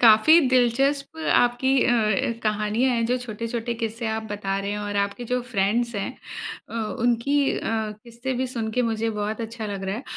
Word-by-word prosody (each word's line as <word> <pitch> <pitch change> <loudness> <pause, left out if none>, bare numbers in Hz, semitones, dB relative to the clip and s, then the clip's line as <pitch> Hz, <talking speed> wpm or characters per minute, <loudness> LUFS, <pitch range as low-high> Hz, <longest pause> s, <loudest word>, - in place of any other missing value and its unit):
काफ़ी 230 +8 +8
दिलचस्प 270 +4 +2 0.2
आपकी 245 +2 +3
अ, 220 -2 +2
कहानियाँ 215 +4 +1
है 230 - +1
जो 245 +2 +1
छोटे-छोटे 230 0 -4
किस्से 230 0 -3
आप 220 0 -2
बता 195 -1 -2
रहे 200 0 -3
हैं 210 - -2
और 205 0 -3
आपके 200 +4 -1
जो 250 +2 0
फ्रेंड्स 235 +1 0
हैं। 200 +3 -2 0.6
अ, - - -9 0.3
उनकी 240 +3 +1 0.2
अ, - - -5 0.4
किस्से 240 +3 -5
भी 260 - +1
सुन 230 -3 -3
के 250 - +1
मुझे 225 0 -1
बहुत 210 +1 -3
अच्छा 225 -1 -5
लग 200 -2 -4
रहा 195 +2 -2
है 240 - -6
230 Hz, 185 wpm, -24 LUFS, 210-245 Hz, 0.6 s, काफ़ी